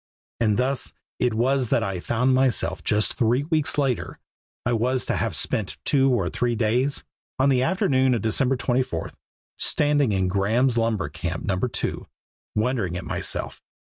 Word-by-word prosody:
And 110 -3 +2
thus 130 +2 -1 0.3
it 125 -3 +1
was 130 +1 +1
that - - +2
I 95 -2 -3
found 125 +7 +1
myself 130 -1 +1
just 105 0 +2
three 125 +1 +1
weeks 155 -2 0
later 135 -4 -1 0.5
I 120 - +1
was 125 +3 0
to - - -1
have - - -1
spent 105 -4 -1
two 135 -2 +3
or 120 - +1
three 120 -1 -1
days 120 +5 0 0.3
on 135 +2 +3
the 130 -2 +3
afternoon 130 -4 +2
of 115 - -3
December 125 +4 +1
24, 125 +1 -1 0.5
standing 145 -4 +3
in 95 -2 +1
Graeme's 110 +7 +1
Lumber 115 -8 0
Camp 85 +3 -5
No. 100 -3 0
2, 125 +4 -1 0.5
wondering 110 -6 0
at - - -6
myself. - - -2
125 Hz, 160 wpm, -24 LUFS, 110-130 Hz, 0.5 s, two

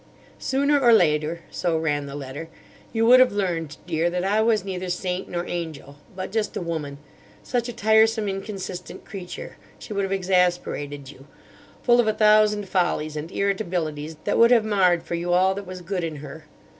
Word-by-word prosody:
"'Sooner 280 +2 +2
or 245 -3 +5
later,' 160 -4 +3
so 170 -2 0
ran 145 -3 -1
the 140 - -7
letter, 145 +3 -7 0.4
'you 225 -1 +1
would 250 +2 +8
have 255 0 +6
learned, 170 -7 -2
Dear, 165 +2 0
that 180 +1 -2
I 205 +3 +2
was 220 -3 +2
neither 185 -1 -4
saint 180 +1 -3
nor 175 0 -3
angel; 155 -5 -6 0.2
but 185 0 -5
just 220 0 -1
a - - -1
woman—such 150 - -5
a - - -5
tiresome, 220 0 +3
inconsistent 195 -2 -6
creature; 185 -3 -8 0.2
she 215 - -8
would 200 - 0
have 195 - -3
exasperated 175 -7 0
you—full 150 - -3
of 235 - +3
a 215 - +2
thousand 210 -1 +4
follies 175 -5 0
and 155 +3 -5
irritabilities 170 -6 -2
that - - 0
would 230 0 +7
have 235 -3 +4
marred 185 -5 +3
for - - -6
you 175 +1 -1
all 185 +2 +4
that 200 -1 -7
was 185 0 -7
good 180 0 -3
in 160 -2 -3
her. 150 +2 -10
180 Hz, 180 wpm, -24 LUFS, 160-210 Hz, 0.4 s, would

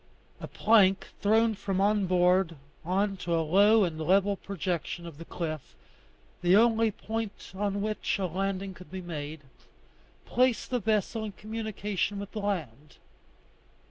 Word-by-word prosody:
A - - -6
plank 205 -3 +3
thrown 220 +2 +3
from 195 -2 -3
on 205 0 +2
board 180 -1 +3 0.3
on 195 +3 0
to 175 -2 -1
a 165 -1 +1
low 205 +6 +5
and 160 -3 -2
level 195 +4 +3
projection 180 -3 -4
of 165 -3 -10
the 165 - -8
cliff, 155 -5 -5 0.7
the 180 +1 +5
only 225 0 +4
point 220 0 -5
on 200 +1 -1
which 215 -1 -1
a 195 - -1
landing 195 +2 -2
could 180 -1 -14
be 185 +2 -6
made, 155 -2 -6 0.8
placed 250 0 +1
the 250 - +1
vessel 220 +1 0
in 210 -2 -5
communication 210 -2 -3
with 200 0 -6
the 215 - -5
land. 150 - -4
195 Hz, 145 wpm, -29 LUFS, 175-210 Hz, 0.8 s, low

